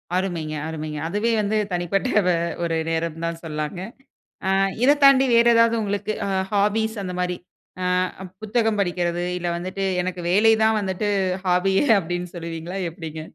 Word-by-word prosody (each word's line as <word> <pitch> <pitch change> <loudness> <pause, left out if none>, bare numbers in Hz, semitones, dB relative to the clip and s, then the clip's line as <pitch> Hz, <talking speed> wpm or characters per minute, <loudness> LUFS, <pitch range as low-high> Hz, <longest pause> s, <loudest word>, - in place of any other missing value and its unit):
அருமைங்க, 175 -5 -2
அருமைங்க. 155 -2 -5
அதுவே 210 +6 0
வந்து 210 +1 0 0.2
தனிப்பட்ட 180 +7 0 0.6
ஒரு 165 -1 0
நேரம்னு 165 0 -2
தா - - 0 0.2
சொல்லாங்க. 155 +2 -4 0.7
அ - - +2 0.3
இத 290 +2 +5
தாண்டி 275 -1 +7
வேற 235 0 +5
ஏதாவது 230 0 +4
உங்களுக்கு 205 +1 -2
அ - - -2 0.2
ஹாபிஸ் 215 +2 +1
அந்த 180 -1 -4
மாரி 180 -1 -1 0.5
அ - - 0 0.6
புத்தகம் 220 0 +1
படிக்கிறது, 175 -2 -1
இல்ல 175 0 -3
வந்துட்டு, 185 +3 -4 0.2
எனக்கு 180 -1 -4
வேலை 215 +4 +5
தான் 220 0 +3
வந்துட்டு 195 +2 -2 0.4
ஹாபி 180 +2 +2 0.3
அப்டினு 175 +1 -4
சொல்வீங்களா? 170 +2 -6
எப்டிங்க? 160 -1 -7
180 Hz, 145 wpm, -23 LUFS, 170-210 Hz, 0.7 s, தாண்டி